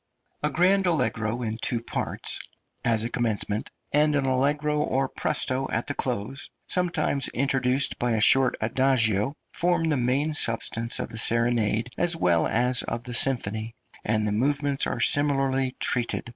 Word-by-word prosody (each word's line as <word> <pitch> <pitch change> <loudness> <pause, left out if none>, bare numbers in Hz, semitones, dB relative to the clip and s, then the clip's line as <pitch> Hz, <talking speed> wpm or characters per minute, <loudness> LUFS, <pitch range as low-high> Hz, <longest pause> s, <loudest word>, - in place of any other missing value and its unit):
A 150 - 0
grand 190 +3 +2
allegro 125 -7 0
in 110 -1 -3
two 115 -1 0
parts, - - 0 0.4
as 115 -2 +2
a 115 - -2
commencement, 110 -2 -1 0.2
and 150 +1 +3
an 140 -1 0
allegro 145 +3 0
or 135 -1 0
presto 135 -2 -1
at 110 - -1
the 145 - -2
close, 130 0 -4 0.2
sometimes 165 -6 0
introduced 135 0 0
by 120 -1 0
a 110 - 0
short 130 +4 +3
adagio, 115 0 +1 0.2
form 175 -2 0
the 150 - +1
main 135 +5 0
substance 115 -3 +1
of - - -4
the 115 - -1
serenade 115 -1 +2
as 175 -1 +2
well 85 - +1
as 125 +2 +1
of 115 - -5
the 125 - -7
symphony, 115 -3 0 0.3
and 110 0 0
the 105 - -1
movements 140 +5 0
are - - -3
similarly 135 -2 +2
treated. 120 -2 +1
130 Hz, 155 wpm, -25 LUFS, 115-145 Hz, 0.4 s, and